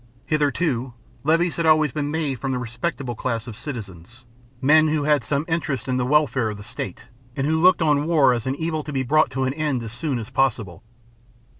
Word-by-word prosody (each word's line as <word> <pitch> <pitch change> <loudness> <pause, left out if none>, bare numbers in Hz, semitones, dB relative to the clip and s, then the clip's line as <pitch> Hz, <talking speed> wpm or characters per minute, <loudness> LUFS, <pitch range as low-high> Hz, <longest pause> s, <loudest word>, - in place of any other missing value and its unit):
Hitherto, 145 -4 0 0.3
levies 165 +3 +2
had 165 -1 +1
always 155 -2 +4
been 145 +2 -2
made 150 -5 -2
from 135 - -3
the 130 - 0
respectable 125 +2 -3
class 115 -1 -3
of 120 -4 -8
citizens, 115 - -8 0.3
men 155 +4 +5
who 155 -1 0
had 145 -3 +2
some 140 +6 -1
interest 150 -7 -2
in 130 -1 0
the 125 - 0
welfare 130 -5 +2
of 105 - -6
the 105 - -10
state, 95 -3 -7 0.3
and 135 - -1
who 160 +2 +1
looked 180 -1 +5
on 150 -1 +2
war 150 -6 +4
as 120 0 -3
an 130 - 0
evil 160 +1 -2
to 150 - -7
be 135 -2 -1
brought 155 +5 +3
to 130 +1 -2
an 130 0 0
end 145 -5 -1
as 110 -1 -6
soon 140 0 -2
as 115 +1 -7
possible. 115 -9 0
135 Hz, 210 wpm, -23 LUFS, 120-155 Hz, 0.3 s, men